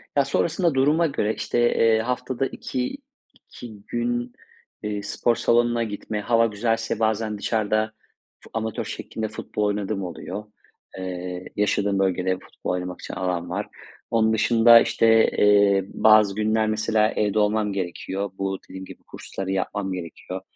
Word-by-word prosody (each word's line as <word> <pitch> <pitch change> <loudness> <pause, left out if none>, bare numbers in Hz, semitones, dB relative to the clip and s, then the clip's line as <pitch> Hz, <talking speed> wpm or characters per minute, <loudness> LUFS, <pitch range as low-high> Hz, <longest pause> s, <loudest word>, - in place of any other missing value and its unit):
Ya, 140 - +3
sonrasında 170 +4 +1
duruma 150 +5 +3
göre, 110 -7 -1
işte, 120 - -2
eee, 115 -2 +3
haftada 125 +2 -2
iki 260 - -4 0.4
iki 120 -2 -12
gün, 120 +1 -2 0.5
eee, 105 -1 -3
spor 115 +3 0
salonuna 120 0 +2
gitme, 105 0 -4
hava 115 +1 +3
güzelse 115 +1 -1
bazen 110 -1 0
dışarıda 110 0 0 0.5
fu - - -17
amatör 110 -1 -3
şeklinde 110 -1 -5
futbol 105 0 -4
oynadığım 105 -1 -1
oluyor. 90 +4 -6 0.5
Eee, 90 -1 -5
yaşadığım 100 -1 +1
bölgede 95 -1 0
futbol - - -6
oynamak 90 0 -4
için - - -7
alan 90 -2 -2
var. 100 +3 -3 0.4
Onun 110 -1 +3
dışında, 115 +1 +6
işte, 115 0 +4
eee, 100 -2 +4
bazı 110 -2 +5
günler, 110 +1 +1
mesela, 110 0 +2
evde 105 0 0
olmam 105 0 +1
gerekiyor. 95 +1 -3
Bu, 95 0 -2
dediğim 95 0 -8
gibi, - - -13
kursları 95 0 -6
yapmam 95 +1 -2
gerekiyor. 90 +1 -7
110 Hz, 140 wpm, -24 LUFS, 95-115 Hz, 0.5 s, dışında